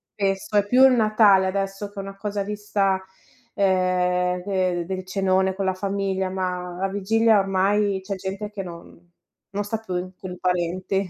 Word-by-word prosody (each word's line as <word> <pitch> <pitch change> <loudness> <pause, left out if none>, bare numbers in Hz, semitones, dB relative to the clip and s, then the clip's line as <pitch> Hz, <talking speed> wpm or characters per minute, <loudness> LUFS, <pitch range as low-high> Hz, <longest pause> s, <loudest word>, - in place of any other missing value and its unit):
spesso 195 +1 -1
è 205 0 +3
più 255 +4 +6
il 260 - +6
Natale 215 -4 +5
adesso 195 +1 -3
che 205 - -21
una 195 0 -6
cosa 205 0 -3
vista, 200 -2 -1 0.5
ehm, 180 -1 +1
de 185 -3 0
del 185 0 -4
cenone 190 0 +1
con 195 -1 -2
la 190 - +1
famiglia, 195 0 -2
ma 180 -1 -3
la 195 - +1
vigilia 215 +2 +3
ormai, 195 +1 +1
c'è 195 0 -4
gente 195 +2 -5
che 205 -2 -5
non 170 0 -12 0.4
non 205 +1 -1
sta 220 +1 -3
più 185 -3 -4
con 185 -1 -7
i 180 - -7
parenti. 180 +1 -1
195 Hz, 170 wpm, -23 LUFS, 185-205 Hz, 0.5 s, più